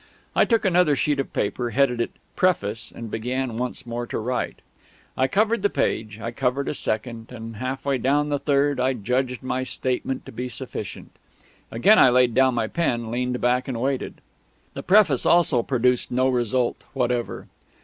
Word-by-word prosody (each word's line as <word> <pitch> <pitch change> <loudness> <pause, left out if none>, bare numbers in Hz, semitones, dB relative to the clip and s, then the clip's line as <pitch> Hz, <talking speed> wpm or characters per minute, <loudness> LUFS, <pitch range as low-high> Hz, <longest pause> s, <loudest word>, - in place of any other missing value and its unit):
I - - +5
took 230 -3 +1
another 180 -5 +4
sheet 145 +1 0
of 135 - -2
paper, 120 +4 -1
headed 125 -1 +2
it - - -1 0.3
"Preface," 110 - +1
and 115 -2 -8
began 125 +1 -2
once 125 +1 -3
more 120 0 -4
to - - -3
write. 125 +3 -3 0.5
I 130 - +2
covered 215 - +1
the 205 - +2
page; 110 - -2
I 115 +1 -4
covered 135 +2 -1
a - - -1
second; 115 -2 -3
and 115 -2 -8
half 130 +4 -4
way 140 -2 +1
down 145 +4 +1
the 145 -1 0
third 140 -1 +1
I 130 +1 +2
judged 125 +3 -2
my 130 0 -1
statement 130 0 -2
to - - -9
be 125 +1 -5
sufficient. 120 - -6 0.6
Again 200 - +5
I 130 - +7
laid 125 -1 +3
down 130 0 +3
my 115 -2 +1
pen, 120 -4 -1
leaned 125 +1 -1
back, 125 +1 +1
and 125 -4 -3
waited. 135 +1 -2 0.5
The - - -5
Preface 185 - +4
also 165 -8 +4
produced 125 0 +1
no 130 +1 +2
result 125 0 0
whatever. 125 -2 -1
125 Hz, 180 wpm, -24 LUFS, 120-140 Hz, 0.6 s, I